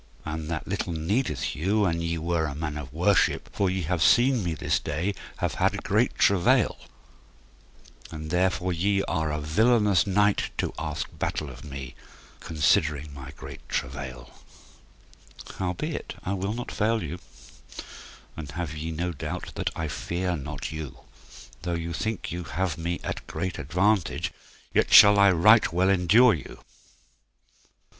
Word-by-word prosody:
and 80 Hz, 0 st, -4 dB
that 80 Hz, -2 st, -4 dB
little 85 Hz, -, -2 dB
needeth 100 Hz, +12 st, -1 dB
you 100 Hz, +7 st, +1 dB
an 85 Hz, -2 st, 0 dB
ye 85 Hz, 0 st, -1 dB
were 80 Hz, 0 st, 0 dB
a 70 Hz, -, -5 dB
man 75 Hz, 0 st, -4 dB
of 75 Hz, -3 st, -7 dB
worship, -, -, +2 dB
for 100 Hz, -2 st, +1 dB
ye 95 Hz, -1 st, -2 dB
have 85 Hz, +1 st, -1 dB
seen 120 Hz, +6 st, +4 dB
me 85 Hz, -2 st, -2 dB
this -, -, 0 dB
day 85 Hz, +7 st, -2 dB, 0.2 s
have -, -, -1 dB
had -, -, +1 dB
great -, -, +1 dB
travail, 95 Hz, -3 st, +3 dB, 1.3 s
and 80 Hz, 0 st, -7 dB
therefore 90 Hz, 0 st, +1 dB
ye 100 Hz, +3 st, +1 dB
are 80 Hz, -1 st, -1 dB
a 75 Hz, -, -2 dB
villainous 105 Hz, +6 st, +3 dB
knight 100 Hz, +1 st, +2 dB
to -, -, -1 dB
ask 75 Hz, -2 st, -3 dB
battle 75 Hz, -3 st, -2 dB
of 65 Hz, 0 st, -12 dB
me, 70 Hz, -4 st, -7 dB, 0.5 s
considering 75 Hz, -1 st, +1 dB
my 70 Hz, -1 st, -9 dB
great -, -, -9 dB
travail; 65 Hz, -1 st, -4 dB, 1.3 s
howbeit 95 Hz, -, -3 dB
I 95 Hz, -, -2 dB
will 100 Hz, +2 st, -2 dB
not 120 Hz, +1 st, -5 dB
fail 110 Hz, +1 st, 0 dB
you, 90 Hz, -, -5 dB, 1.2 s
and 80 Hz, -3 st, -7 dB
have 85 Hz, -2 st, -4 dB
ye 80 Hz, +2 st, -4 dB
no 85 Hz, +3 st, -2 dB
doubt 75 Hz, -, -5 dB
that -, -, -2 dB
I 80 Hz, -, -2 dB
fear 90 Hz, +4 st, -2 dB
not 75 Hz, 0 st, -5 dB
you; 80 Hz, -3 st, -7 dB, 0.6 s
though 90 Hz, -1 st, -2 dB
you 85 Hz, 0 st, -4 dB
think 105 Hz, +1 st, -3 dB
you 90 Hz, 0 st, -4 dB
have 90 Hz, -3 st, -2 dB
me 85 Hz, +2 st, -3 dB
at -, -, -3 dB
a -, -, -13 dB
great 90 Hz, -3 st, -3 dB
advantage 90 Hz, +6 st, +1 dB, 0.4 s
yet -, -, +2 dB
shall 105 Hz, 0 st, +9 dB
I 100 Hz, 0 st, +7 dB
right 105 Hz, +6 st, +5 dB
well 90 Hz, +3 st, +2 dB
endure 105 Hz, +6 st, +5 dB
you. 75 Hz, -, -7 dB
85 Hz, 155 wpm, -26 LUFS, 75-100 Hz, 1.3 s, shall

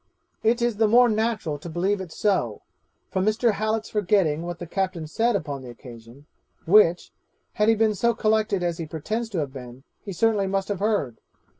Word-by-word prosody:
'It 235 Hz, +2 st, +2 dB
is 240 Hz, -3 st, 0 dB
the 220 Hz, 0 st, +3 dB
more 245 Hz, +3 st, +6 dB
natural 215 Hz, -9 st, -1 dB
to 170 Hz, -, -8 dB
believe 190 Hz, +4 st, -1 dB
it 180 Hz, -4 st, -8 dB
is -, -, -12 dB
so, 185 Hz, -, 0 dB, 0.5 s
from 190 Hz, -, 0 dB
Mr. 220 Hz, +3 st, +2 dB
Hallet's 215 Hz, +1 st, -2 dB
forgetting 190 Hz, -7 st, +1 dB
what 175 Hz, 0 st, -5 dB
the 175 Hz, -, -7 dB
captain 185 Hz, -2 st, -2 dB
said 225 Hz, +9 st, 0 dB
upon 145 Hz, -7 st, -3 dB
the 125 Hz, -, -10 dB
occasion, 120 Hz, +2 st, -13 dB, 0.4 s
which, 175 Hz, -1 st, +4 dB, 0.4 s
had 210 Hz, +1 st, +2 dB
he 225 Hz, -, +5 dB
been 220 Hz, 0 st, +2 dB
so 235 Hz, +3 st, +1 dB
collected 215 Hz, -4 st, +1 dB
as 175 Hz, -1 st, -2 dB
he 165 Hz, -, -4 dB
pretends 215 Hz, +9 st, -4 dB
to 200 Hz, -, -5 dB
have 145 Hz, -4 st, -2 dB
been, 125 Hz, -1 st, -10 dB, 0.2 s
he 200 Hz, -, -6 dB
certainly 205 Hz, +1 st, +1 dB
must 195 Hz, +1 st, -2 dB
have 200 Hz, -3 st, -2 dB
heard. 200 Hz, -, -1 dB
195 Hz, 195 wpm, -24 LUFS, 160-220 Hz, 0.5 s, more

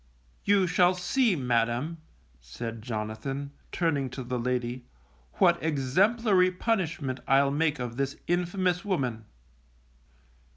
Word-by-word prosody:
You 200 Hz, -2 st, +4 dB
shall 180 Hz, +1 st, +3 dB
see, 205 Hz, +4 st, +2 dB
Madam, 125 Hz, +4 st, 0 dB, 0.4 s
said 115 Hz, -, -7 dB
Jonathan, 115 Hz, +5 st, -4 dB, 0.2 s
turning 145 Hz, -6 st, 0 dB
to 130 Hz, +1 st, -6 dB
the 125 Hz, 0 st, -3 dB
lady, 125 Hz, 0 st, -2 dB, 0.5 s
_what 170 Hz, -2 st, +4 dB
exemplary 185 Hz, -, +3 dB
punishment 175 Hz, -, -1 dB
I'll 140 Hz, +1 st, +4 dB
make 150 Hz, +1 st, +1 dB
of 120 Hz, -1 st, -5 dB
this 140 Hz, 0 st, -1 dB
infamous 180 Hz, +1 st, 0 dB
woman. 130 Hz, -, -2 dB
140 Hz, 110 wpm, -28 LUFS, 125-180 Hz, 0.5 s, You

